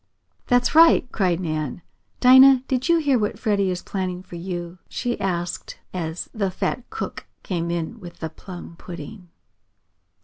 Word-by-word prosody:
"That's 245 0 +3
right!" 325 -4 +7
cried 180 -4 +1
Nan. 155 -2 -3 0.4
"Dinah, 260 +1 +8
did 260 +1 -1
you 340 - +6
hear 285 -6 +2
what 210 -1 -1
Freddie 200 -4 +1
is 180 -1 -3
planning 185 -2 -3
for 175 - -11
you?" 175 0 -5
she 245 -1 -2
asked 175 -2 -3 0.2
as 165 -2 -4
the 200 -4 0
fat 235 +6 -3
cook 445 - -6 0.2
came 170 -3 -2
in 170 +6 -3
with 175 -4 -11
the 160 -1 -5
plum 175 -1 -10
pudding. 175 +3 -9
185 Hz, 150 wpm, -23 LUFS, 175-245 Hz, 0.4 s, Dinah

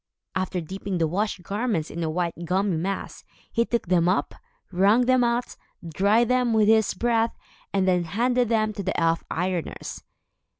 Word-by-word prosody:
After 185 -1 -2
dipping 190 +3 -4
the 165 -1 +1
washed 195 +2 -2
garments 205 -5 -2
in 170 - -5
the 160 - -1
white 170 +1 -1
gummy 190 +1 +1
mass, 190 +4 -4 0.3
he 230 0 +1
took 235 0 -1
them 175 -1 +3
up, 185 - 0 0.4
wrung 205 +7 +4
them 255 0 +4
out, 240 +1 -1 0.3
dried 205 +8 +2
them 250 -1 +2
with 215 -1 +4
his 220 -2 +3
breath, 230 +2 +1 0.3
and 190 -1 +1
then 180 -2 +2
handed 240 +7 +1
them 215 -2 +1
to 200 - -5
the 190 0 -2
elf 165 0 +1
ironers. 180 -1 -3
195 Hz, 170 wpm, -25 LUFS, 180-230 Hz, 0.4 s, wrung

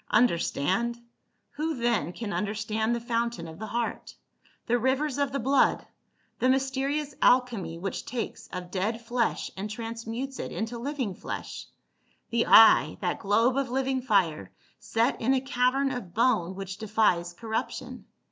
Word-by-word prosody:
Understand 220 - +1 0.3
?— - - -48
Who 315 +1 -1
then 235 - 0
can 205 +2 -5
understand 215 +4 -1
the - - -2
fountain 235 -6 -2
of 160 +2 -10
the 220 - -5
heart, 230 +2 -3 0.5
the 240 0 +2
rivers 270 +3 0
of 280 -1 +1
the 275 - -1
blood, 270 +2 +2 0.5
the 255 - +3
mysterious 270 +2 0
alchemy 230 -10 +2
which 190 +3 -4
takes 240 -2 -4
of 180 -1 -7
dead 210 +4 -1
flesh 235 0 -1
and 200 +2 -4
transmutes 230 +4 -5
it - - -4
into 225 +2 -4
living 260 -5 -3
flesh; - - -6 0.6
the 230 0 +1
eye, 225 - +7
that - - -2
globe 230 +5 +2
of 275 -2 0
living 265 +1 0
fire, 185 - +1 0.3
set 230 +4 0
in 260 +4 +3
a - - +2
cavern 265 +1 +1
of 215 -9 -6
bone 215 -7 +2
which 195 0 -6
defies 200 -5 +1
corruption. 220 +3 -4
230 Hz, 150 wpm, -27 LUFS, 205-260 Hz, 0.6 s, eye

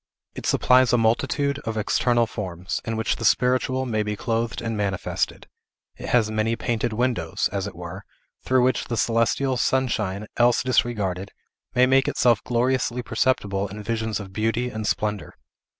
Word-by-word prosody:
It - - -6
supplies 130 0 +4
a 125 - +4
multitude 140 +5 +1
of 110 -4 -4
external 120 +2 +2
forms, 95 -4 -5
in 115 -1 -2
which 110 - 0
the - - -6
spiritual 130 +3 +2
may 110 -4 0
be 105 0 -2
clothed 115 +1 -2
and 115 -1 -3
manifested; 100 -3 -2 0.5
it - - -7
has 110 -3 +3
many 110 +1 0
painted 115 -1 -1
windows, 120 +2 0
as 100 0 -2
it 100 - -8
were, 90 +3 -8 0.4
through 130 -1 +3
which 130 +1 +1
the 115 - -3
celestial 120 +4 +1
sunshine, 110 -7 0
else 120 0 +4
disregarded, 100 -7 0 0.5
may 125 +1 +6
make 135 +1 +3
itself 120 -4 +2
gloriously 125 0 0
perceptible 100 -7 0
in 105 +2 -8
visions 110 -1 -2
of 95 -2 -9
beauty 115 +4 -1
and 110 -1 -4
splendor. 105 -1 -2
115 Hz, 160 wpm, -24 LUFS, 105-125 Hz, 0.5 s, may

